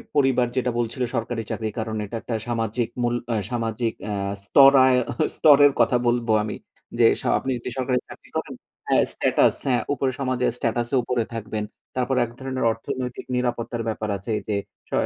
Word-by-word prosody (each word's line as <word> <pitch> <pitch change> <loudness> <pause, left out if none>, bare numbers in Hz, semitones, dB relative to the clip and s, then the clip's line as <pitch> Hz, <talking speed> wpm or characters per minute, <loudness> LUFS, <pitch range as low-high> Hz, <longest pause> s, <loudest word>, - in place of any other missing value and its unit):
পরিবার 135 -3 +3
যেটা 125 -1 +1
বলছিল 120 +2 -2
সরকারি 115 0 -2
চাকরি 110 -1 -2
কারণ 110 0 -3
এটা 115 - -7
একটা 115 - -4
সামাজিক 115 0 -1 0.2
মূল 120 0 +1 0.2
আ - - +1 0.2
সামাজিক 115 -1 -1 0.2
আ - - -1 0.3
স্তরায় 135 -1 +6 0.4
স্তরের 145 -1 +7
কথা 120 +1 +4
বলব 120 0 +1 0.2
আমি। 105 - -4 0.4
যে - - +6 0.2
স - - -13
আপনি 135 - -4
যদি 125 - -6
সরকারি 125 -1 +1
চাকরি - - -14
করেন - - -4 0.3
হ্যাঁ, - - +4
স্ট্যাটাস - - +3
হ্যাঁ, 125 -2 +2
ওপরের 130 -1 -1
সমাজের 130 -2 0
স্ট্যাটাসে 120 +3 -1
উপরে 120 -1 0
থাকবেন 110 -1 -4 0.3
তারপর 130 +1 0
এক 115 - -11
ধরনের 130 -1 -3
অর্থনৈতিক 125 +2 -5
নিরাপত্তার 120 -1 -2
ব্যাপার 110 -1 -3
আছে 100 +4 -6 0.2
যে 105 - 0 0.3
স - - -36
120 Hz, 165 wpm, -24 LUFS, 115-130 Hz, 0.4 s, স্তরের